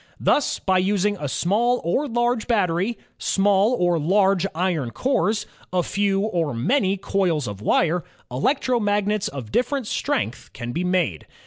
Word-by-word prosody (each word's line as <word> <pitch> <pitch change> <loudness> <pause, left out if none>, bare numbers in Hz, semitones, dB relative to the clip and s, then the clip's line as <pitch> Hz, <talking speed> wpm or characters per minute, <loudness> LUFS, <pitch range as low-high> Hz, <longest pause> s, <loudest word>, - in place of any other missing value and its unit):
Thus 290 - +2
by 185 -1 +1
using 205 +2 +1
a 145 - -3
small 230 - +1
or 265 - 0
large 240 -1 0
battery, 200 -1 +1 0.2
small 200 +3 +2
or 175 -2 +2
large 190 +3 +2
iron 165 -7 0
cores, 210 - 0 0.3
a 180 -1 +1
few 195 +1 0
or 170 - -1
many 195 - +1
coils 180 -7 0
of 100 -1 -6
wire, 170 +9 +2 0.3
electromagnets 210 - 0
of 130 -6 -8
different 265 - 0
strength 255 - -2
can 120 0 -5
be 170 +7 -2
made. 180 - 0
195 Hz, 140 wpm, -23 LUFS, 170-215 Hz, 0.3 s, Thus